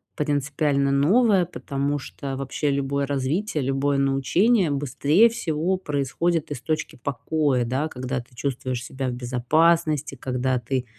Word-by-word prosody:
принципиально 145 -1 0
новое. 190 - +4
Потому 140 -1 -3
что 135 0 -6
вообще 135 +2 -2
любое 140 0 0
развитие, 145 +5 -1
любое 135 +2 0
научение 150 - +2
быстрее 145 - +3
всего 175 -4 -1
происходит 150 +1 -1
из 125 - -5
точки 155 -1 -2
покоя, 140 0 0
да? 130 +6 -1
Когда 130 -2 -4
ты 120 - -22
чувствуешь 125 -1 -3
себя 130 +1 -4
в - - -2
безопасности, 150 +5 +1
когда 130 0 -1
ты 125 +2 -2
140 Hz, 130 wpm, -24 LUFS, 130-155 Hz, -, новое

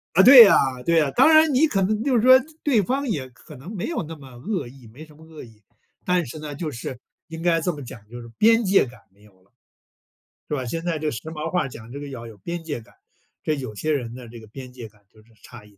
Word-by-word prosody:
啊， 190 - +6
对 250 +1 +11
呀 205 - +6 0.3
对 170 0 +2
呀。 150 -3 0
当 - - +6
然 315 -1 +5
你 285 +5 +4
可 200 -9 -1
能 215 +3 -1
就 270 -1 +1
是 230 - +3
说， 255 +2 +7 0.2
对 255 -8 +3
方 270 +8 -2
也 140 -11 -3
可 140 +4 -16
能 160 - -10
没 180 - -4
有 330 - -3
那 165 +1 -8
么 140 -3 -14
恶 170 - -4
意， 125 -1 -15
没 130 +9 -13
什 155 -1 -19
么 160 - -17
恶 160 -1 -12
意。 110 -3 -18 0.4
但 180 -2 +1
是 145 +5 -9
呢， 150 -1 -7
就 155 +1 -5
是 125 0 -7 0.3
应 165 -1 -9
该 170 -1 +2
这 180 - -1
么 145 - -9
讲， 115 - -10
就 120 +1 -9
是 115 - -11
边 225 +2 +4
界 195 -5 +3
感 125 0 -14
没 100 +2 -26
有 105 -1 -21
了， 95 - -33 1.0
是 150 - -2
吧？ 130 -3 -3
现 165 +7 -4
在 170 -3 -2
这 155 0 -2
时 120 - -5
髦 155 -1 -5
话 180 - 0
儿 - - -4
讲 115 -2 -12
这 140 - -7
个 145 - -8
要 120 -4 -8
有 110 -3 -13
边 170 - -6
界 145 -6 -5
感， 115 +2 -21 0.5
这 155 - -1
有 130 -7 -7
些 155 +9 -2
人 120 -5 -3
的 125 -1 -11
这 120 +1 -11
个 110 - -14
边 125 +3 -11
界 120 -3 -10
感 105 -1 -28
就 110 - -21
是 115 +1 -26
差 120 -4 -13
一 105 - -19
点 100 - -26
150 Hz, 300 characters per minute, -23 LUFS, 120-180 Hz, 1.0 s, 对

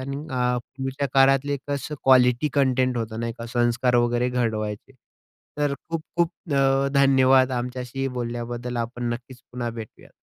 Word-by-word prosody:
आणि 135 +1 -4
अ, 125 -1 +1
पूर्वीच्या 135 +3 -4
काळातले 135 +1 +4
कसं 145 +1 -3
क्वालिटी 125 +1 +5
कंटेंट 130 -2 +2
होतं 110 -1 -3
नाही 115 0 -2
का, 115 - -6
संस्कार 120 +1 +1
वगैरे 120 +1 +2
घडवायचे. 110 -1 -2 0.7
तर 145 -1 +1
खूप-खूप 165 +1 -1 0.2
अ, 135 0 +3
धन्यवाद 135 -1 +5
आमच्याशी 125 +2 -4
बोलल्याबद्दल. 120 0 -4
आपण 120 +1 -3
नक्कीच 125 +1 -9
पुन्हा 120 -1 -3
भेटूयात. 115 -2 -10
125 Hz, 135 wpm, -24 LUFS, 120-135 Hz, 0.7 s, क्वालिटी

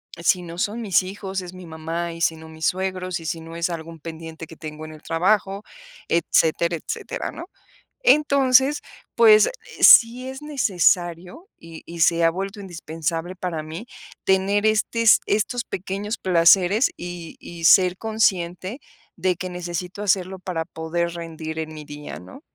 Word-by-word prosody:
Si 170 +2 +1
no 170 -1 -9
son 210 +6 -2
mis 195 -5 +2
hijos, 190 0 -5
es 180 0 -9
mi 185 -1 -11
mamá 165 +2 -4
y 165 - -10
si 165 - +2
no 160 0 -12
mis 160 0 -6
suegros 185 -1 -2
y 165 - -11
si 165 +1 -3
no 165 +1 -10
es 170 +1 -1
algún 165 -1 -7
pendiente 160 +1 -8
que 160 - -12
tengo 155 -1 -8
en 155 - -10
el 155 - -14
trabajo, 195 +4 0 0.4
etcétera 170 0 +2
etcétera, - - -5
¿no?, 335 - -8 0.6
entonces, 280 - +4 0.4
pues 445 +1 +7 0.3
sí 245 +2 +7
es 265 +1 -7
necesario 185 - 0
y 165 -1 -12
y 170 0 -9
se 170 +1 +4
ha 165 - +5
vuelto 195 +4 -5
indispensable 165 -1 -4
para 175 -4 -4
mí 165 +10 -8 0.3
tener 195 +2 +2
estes 220 +1 +4
estos 220 +3 0
pequeños 200 +4 -4
placeres 185 +5 +4
y 175 -2 -8
y 170 -1 -9
ser 180 +1 +6
consciente 205 -2 -1 0.4
de 185 -1 +1
que 185 +1 -6
necesito 180 +2 -5
hacerlo 190 -1 0
para 180 -3 -4
poder 165 +2 -3
rendir 160 -1 -6
en 155 0 -5
mi 155 -1 -9
día, 145 0 -9
¿no? 270 - -13
180 Hz, 160 wpm, -23 LUFS, 165-200 Hz, 0.6 s, pues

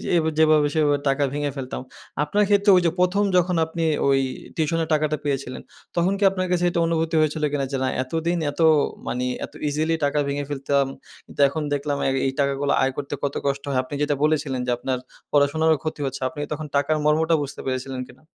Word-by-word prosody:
এই - - +5 0.2
যেভাবে 155 -2 +5
সেভাবে 145 -2 +3
টাকা 135 +1 +1
ভেঙে 145 0 -1
ফেলতাম। 130 -2 -5 0.4
আপনার 205 +8 +1
ক্ষেত্রে 205 0 +4
ওই 180 - +5
যে 165 - +3
১ম 180 +3 +3
যখন 180 0 +2
আপনি 165 +1 -4 0.2
ওই 135 -1 +4 0.4
টিউশনের 165 +1 0
টাকাটা 155 0 +1
পেয়েছিলেন, 135 -3 -3 0.3
তখন 175 +3 +2
কি - - 0
আপনার 185 -1 -2
কাছে 180 -1 +1
এটা 170 - -1
অনুভূতি 165 0 0
হয়েছিল 155 0 0
কিনা? 140 -2 -1
যে 135 - -1
না - - +1 0.2
এতদিন 165 +6 -1
এত 145 - -5 0.5
মানে 125 +1 -1 0.2
এত - - -19
ইজিলি 155 +3 0
টাকা 145 +1 +1
ভেঙে 140 0 -2
ফেলতাম। 140 0 +1 0.4
কিন্তু - - -16
এখন 155 +3 -3
দেখলাম 145 0 -1
অ্যা - - +2 0.2
এই - - 0
টাকাগুলো 140 0 +1
আয় 135 0 +2
করতে 145 0 -4
কত 140 -1 -1
কষ্ট 140 0 -1
হয়। 135 -2 +1
আপনি 130 - -11
যেটা 145 0 +1
বলেছিলেন 150 -4 +1
যে - - +1
আপনার 130 +1 -2 0.3
পড়াশোনারও 155 +3 +3
ক্ষতি 155 -1 -4
হচ্ছে। 135 0 -4
আপনি 150 - -10
তখন 155 +1 -5
টাকার 145 +2 +2
মর্মটা 160 +2 +3
বুঝতে 140 - -7
পেরেছিলেন 130 0 -3
কিনা? 130 +3 -18
145 Hz, 200 wpm, -23 LUFS, 140-160 Hz, 0.5 s, এই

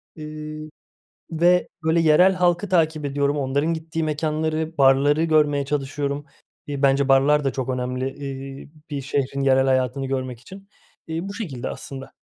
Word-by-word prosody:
Iıı, 155 0 -7 0.6
ve, 175 +2 +3 0.2
böyle, 160 +1 +2
yerel 165 +4 +5
halkı 180 +1 +1
takip 160 -4 +1
ediyorum, 140 +1 0
onların 140 +4 0
gittiği 160 0 -4
mekânları, 155 +1 -2
barları 140 +3 +4
görmeye 150 -3 +2
çalışıyorum. 140 0 -2 0.4
İii, 140 -1 -4
bence 140 0 +3
barlar 145 +2 +4
da 135 - +1
çok 130 -1 -4
önemli, 125 0 -2
ııı, 135 0 -7 0.2
bir 140 -2 -3
şehrin 140 0 -2
yerel 135 -1 +4
hayatını 130 +1 +1
görmek 130 -3 -3
için. 195 +8 -13 0.4
İii, 165 +4 -4
bu 200 - -6
şekilde 160 - -5
aslında. 135 -1 -8
145 Hz, 145 wpm, -23 LUFS, 135-160 Hz, 0.6 s, yerel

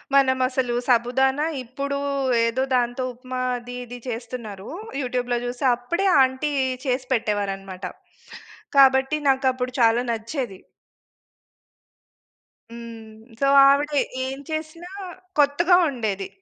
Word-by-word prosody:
మనం 265 -1 +4
అసలు 255 -2 -1
సాబుదాన 260 +3 +2 0.2
ఇప్పుడు 280 +3 -4 0.5
ఏదో 245 +3 0
దాంతో 245 +1 0
ఉప్మా 255 +1 -6 0.2
అది 245 +1 -9
ఇది 245 +1 -8
చేస్తున్నారు, 230 -4 -6 0.3
యూట్యూబ్‌లో 245 -1 -1
చూసి. 245 +2 -5
అప్పుడే 295 +11 -2 0.2
ఆంటీ 260 +3 +1 0.3
చేసి 255 -1 -1
పెట్టేవారు 205 -4 0
అన్నమాట. 190 -1 -9 0.9
కాబట్టి 270 +1 +5
నాకు 265 0 +2
అప్పుడు 250 0 -3
చాలా 230 +1 +4
నచ్చేది. 230 -2 -4 2.1
హ్మ్. 230 -2 -10 0.2
సో, 275 - +2 0.2
ఆవిడ 285 +2 +2 0.3
ఏం 265 +1 -4
చేసినా 320 +3 -5 0.5
కొత్తగా 330 +5 +4
ఉండేది. 210 -7 -3
250 Hz, 105 wpm, -23 LUFS, 235-270 Hz, 2.1 s, కాబట్టి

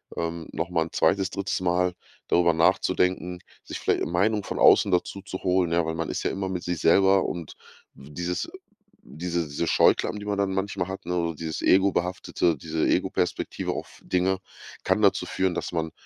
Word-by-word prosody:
ähm, 85 -1 -4
nochmal 80 -1 -1
'n - - -11
2., 95 +4 +2
3. 100 -1 -2
Mal 90 0 +1 0.4
darüber 85 -1 +4
nachzudenken, 90 +2 +1 0.3
sich - - -6
vielleicht - - +1
'ne - - -1
Meinung 105 +4 +1
von - - -4
außen 100 - +6
dazu 90 +2 0
zu 95 - -6
holen. 90 -2 +2
Ja, 85 -1 +2
weil 80 - -2
man 80 0 -3
ist - - -3
ja - - 0
immer 95 0 -3
mit 90 -2 -4
sich 90 -2 -3
selber. 95 +2 +4
Und 85 -3 -5 0.4
dieses 85 +6 -4 0.6
diese 85 +1 -2
diese 75 +4 -3
Scheuklappen, 105 - +3
die 105 - -8
man 105 -1 -2
dann 100 -1 0
manchmal 95 -1 -2
hat, 95 - -7
ne? 85 -1 -1
Dieses 80 -1 -4
Ego 95 +1 +4
behaftete, 90 -2 0
diese 80 +2 -2
Ego-Perspektive - - -1
auf - - -8
Dinge 95 +1 0 0.4
kann - - +1
dazu - - +3
führen, 95 -1 0
dass - - -4
man, 80 -1 -2
90 Hz, 185 wpm, -25 LUFS, 85-95 Hz, 0.6 s, außen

